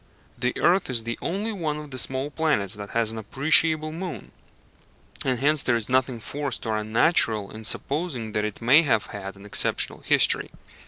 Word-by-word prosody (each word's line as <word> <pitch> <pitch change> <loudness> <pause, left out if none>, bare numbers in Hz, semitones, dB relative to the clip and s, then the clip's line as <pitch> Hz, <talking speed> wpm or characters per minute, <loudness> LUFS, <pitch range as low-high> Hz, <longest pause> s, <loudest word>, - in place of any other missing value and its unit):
The 125 0 -2
earth 180 -1 +2
is 120 -3 0
the 115 +1 -4
only 200 +6 -2
one 160 -6 -3
of 150 -1 -9
the 130 - -1
small 135 +3 -3
planets 145 - 0
that 100 -1 -7
has 115 -1 +1
an 110 - -6
appreciable 155 +7 +2
moon, 175 +2 -7 0.9
and 130 -2 0
hence 145 +3 +2
there 120 - +1
is 115 0 -1
nothing 130 -1 +1
forced 140 +4 -5
or 110 -1 -1
unnatural 110 - +2
in 110 +1 -9
supposing 135 -3 -1
that 105 0 -1
it 105 +1 -5
may 135 +7 +7
have 110 - +1
had 100 -1 -7
an 100 +1 -14
exceptional 105 - +1
history. - - +2
130 Hz, 180 wpm, -24 LUFS, 110-155 Hz, 0.9 s, may